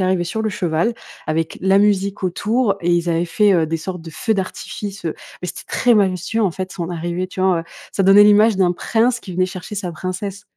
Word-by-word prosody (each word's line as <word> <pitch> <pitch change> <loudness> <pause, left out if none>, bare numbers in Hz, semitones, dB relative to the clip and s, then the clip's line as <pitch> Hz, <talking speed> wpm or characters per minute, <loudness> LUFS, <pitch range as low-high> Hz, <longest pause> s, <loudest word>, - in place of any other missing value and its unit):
arrivé 185 -1 +1
sur 220 +6 -3
le 220 - 0
cheval 180 +2 0 0.3
avec 160 +1 -2
la 190 +1 +3
musique 200 -1 +1
autour 205 +4 0
et 175 +1 0
ils 175 0 +1
avaient 170 +1 0
fait, 205 +3 +3
heu, 165 -3 +2
des 165 +1 -1
sortes 180 +2 -6
de 165 - -10
feux 220 +8 -1
d'artifice, 195 0 -5
heu, 160 - -2 0.3
mais 180 - -3
c'était - - -7
très 245 -1 +3
majestueux, 195 +2 +1
en 195 - +2
fait, 185 +2 -5
son 170 -2 -4
arrivée, 175 +1 -3
tu 185 - -7
vois, 185 -3 +3
heu, - - -8 0.3
ça 195 - 0
donnait 195 +2 +7
l'image 210 0 +5
d'un 180 -2 +3
prince 235 +6 +1
qui 185 - -9
venait 185 - +2
chercher 185 +2 -8
sa 185 -4 -4
princesse. 185 +4 -5
185 Hz, 225 wpm, -19 LUFS, 175-205 Hz, 0.3 s, donnait